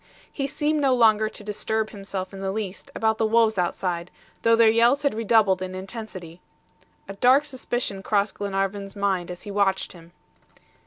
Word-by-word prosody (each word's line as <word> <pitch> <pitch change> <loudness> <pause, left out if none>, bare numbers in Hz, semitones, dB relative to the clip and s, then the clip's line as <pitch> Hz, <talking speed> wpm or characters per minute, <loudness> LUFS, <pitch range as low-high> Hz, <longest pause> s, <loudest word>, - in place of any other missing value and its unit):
He 275 -2 -2
seemed 300 +1 0
no 270 -2 +3
longer 220 -2 +4
to 215 - -9
disturb 215 +1 -2
himself 195 -2 -6
in 195 - -8
the 195 0 -2
least 200 -2 -5
about 220 0 +1
the 225 - +2
wolves 220 -2 +3
outside, 175 0 -2 0.3
though 230 0 +4
their 230 0 +5
yells 235 +6 +4
had 285 - +2
redoubled 215 -4 +3
in 185 0 -5
intensity. 185 -4 -8 0.7
A 195 - -6
dark 255 +8 +4
suspicion 245 -7 -3
crossed 205 0 0
Glenarvan's 195 0 -2
mind 195 -3 -1
as 180 0 -8
he 205 - -7
watched 195 -1 +1
him. 170 -1 -15
205 Hz, 170 wpm, -24 LUFS, 190-230 Hz, 0.7 s, their